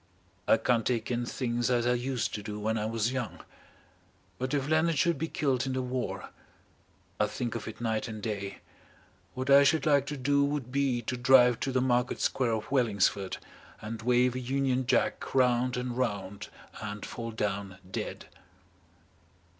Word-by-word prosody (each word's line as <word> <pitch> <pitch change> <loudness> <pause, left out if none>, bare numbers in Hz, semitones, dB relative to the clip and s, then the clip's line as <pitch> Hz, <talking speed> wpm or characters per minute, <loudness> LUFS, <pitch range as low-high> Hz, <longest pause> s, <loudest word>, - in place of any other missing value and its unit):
I - - +6
can't 115 +1 +1
take 120 -1 -1
in 120 0 -1
things 120 -1 -1
as 120 -1 +2
I 125 - +3
used 125 0 -1
to 105 - -3
do 105 0 -6
when 110 +1 0
I 110 -1 -1
was 115 +1 0
young. 130 -3 -4 1.0
But 130 +1 -2
if 140 -1 -1
Leonard 160 +1 +2
should 170 0 +2
be 160 - -1
killed 135 -5 0
in 130 - -1
the 130 0 -1
war 125 0 -4 0.9
I 105 - +3
think 120 +2 -3
of 115 - -5
it 110 -1 -7
night 110 0 -1
and 110 -1 -6
day 100 -2 -4 0.7
what 130 +2 -1
I 140 +1 +9
should 155 +3 +3
like 140 -3 +3
to 145 - -4
do 140 +2 +2
would 140 -3 -2
be 135 -3 +1
to 125 - -2
drive 125 -1 +5
to 135 - -1
the 130 -1 +1
Market 125 -1 +1
Square 125 -3 +1
of 110 +2 -4
Wellingsford 100 -6 +1 0.4
and 110 +1 -6
wave 125 +1 +3
a 130 - -3
Union 130 0 0
Jack - - 0
round 125 -1 +3
and 125 -1 -3
round 100 -6 -3 0.3
and 105 -1 -5
fall 115 -1 -5
down 100 -3 -3
dead." - - -4
125 Hz, 180 wpm, -29 LUFS, 110-130 Hz, 1.0 s, I